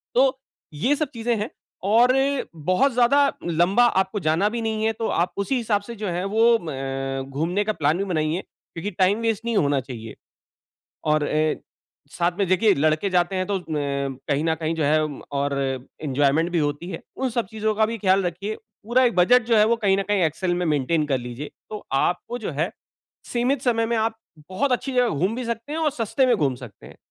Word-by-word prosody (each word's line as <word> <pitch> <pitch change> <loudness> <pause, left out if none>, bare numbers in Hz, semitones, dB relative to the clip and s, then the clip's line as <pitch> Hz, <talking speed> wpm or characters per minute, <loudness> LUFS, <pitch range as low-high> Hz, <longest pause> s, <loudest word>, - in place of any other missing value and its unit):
तो 265 +1 +3 0.4
ये 245 - +2
सब 310 -2 -1
चीज़ें 235 +1 0
हैं, 210 +1 -3 0.3
और 235 +6 +4
अ, 275 +1 +1
बहुत 185 - +2
ज़्यादा 245 +3 +4 0.3
लम्बा 175 +8 +3
आपको 190 -1 0
जाना 165 +6 +2
भी 235 +1 -3
नहीं 220 -1 -1
है, 225 - +2
तो 225 +1 -4
आप 175 +2 0
उसी 230 +7 0
हिसाब 210 -4 0
से 235 +3 -8
जो 210 -2 -4
है 175 +2 -2
वो 225 +4 +4
अ, 135 -3 -4
घूमने 170 +9 -1
का 215 - 0
प्लान 155 0 +1
भी 195 - 0
बनाइए। 160 -2 -1
क्योंकि 170 +5 -8
टाइम 195 +3 +2
वेस्ट 225 -1 -1
नहीं 235 -2 -1
होना 140 -4 +2
चाहिए। 115 -4 -8 0.9
और 155 0 +3
अ, 155 +1 +1 0.6
साथ 175 +1 +1
में 200 - +2
देखिये 195 +3 +4
लड़के 155 +6 +1
जाते 180 +1 +1
हैं, 185 0 -1
तो 200 -2 0
अ, - - -11
कहीं 140 0 -2
न 160 - +2
कहीं 160 0 -2
जो 160 -2 -1
है, 155 +2 +3 0.3
और 140 0 0 0.5
एन्जॉयमेंट 145 +3 +2
भी 175 - 0
होती 150 +4 -2
है। 165 - -6
उन 265 -1 -1
सब 235 -3 -1
चीज़ों 215 +1 -2
का 220 0 +3
भी 230 0 -4
ख़्याल 190 0 +3
रखिए, 195 +5 -4 0.3
पूरा 240 +4 +3
एक 240 - +2
बजट 245 +8 +5
जो 230 -2 +3
है 210 - +6
वो 235 +1 +3
कहीं 200 -4 +2
न - - +1
कहीं 205 -3 +2
एक्सेल 175 +3 0
में 175 0 -1
मेंटेन 150 +1 +1
कर 135 -3 +1
लीजिए। 125 +4 -7 0.2
तो 210 - -7
आपको 180 +7 -1
जो 220 - -4
है, 165 - +1 0.6
सीमित 250 +2 +1
समय 230 -2 +1
में 235 0 0
आप 225 0 0 0.3
बहुत 250 +8 0
अच्छी 255 +2 -1
जगह 250 -1 +3
घूम 185 +9 0
भी 250 - -3
सकते 235 +5 -4
हैं, 320 - -2
और 315 -2 +2
सस्ते 260 0 0
में 245 -3 +4
घूम 140 -7 +1
सकते 125 -5 -12
हैं। - - -14
190 Hz, 215 wpm, -23 LUFS, 155-230 Hz, 0.9 s, है